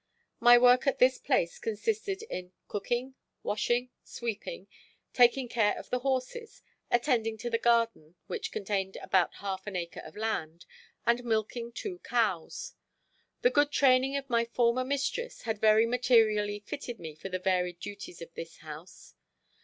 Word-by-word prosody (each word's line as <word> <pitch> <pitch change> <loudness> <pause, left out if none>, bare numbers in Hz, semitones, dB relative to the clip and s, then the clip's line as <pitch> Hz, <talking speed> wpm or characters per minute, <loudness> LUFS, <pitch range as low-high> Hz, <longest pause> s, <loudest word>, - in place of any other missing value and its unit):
My 240 +1 +8
work 250 +2 +5
at 275 - +2
this 255 +1 +4
place 215 -11 0
consisted 395 - -2
in 185 - -7
cooking, 240 +6 -2 0.3
washing, 240 +4 0
sweeping, 235 - -5 0.5
taking 245 +1 +4
care 225 -3 +1
of - - -10
the 250 - +1
horses, 270 - -3 0.3
attending 235 -3 +1
to 240 +2 -5
the 230 - +1
garden, 230 -9 +1
which 440 -1 -4
contained 195 -1 -2
about 185 -3 +1
half 195 0 -5
an 205 - -5
acre 170 -2 -4
of - - -11
land, 170 -7 -3 0.4
and 235 +1 +2
milking 230 +1 -1
two 360 - -6
cows. 235 - -1 0.7
The 245 - +5
good 290 +2 +3
training 265 0 +4
of 275 -1 -5
my 235 -2 +2
former 235 +1 +1
mistress 280 - -2
had 220 -2 -3
very 220 +1 +6
materially 220 -4 +3
fitted 245 +1 -6
me 160 -2 -7
for 155 +6 -8
the 185 - -1
varied 180 -1 0
duties 200 -3 -8
of 165 - -13
this 165 -1 -8
house. 155 +3 -11
235 Hz, 155 wpm, -30 LUFS, 200-255 Hz, 0.7 s, My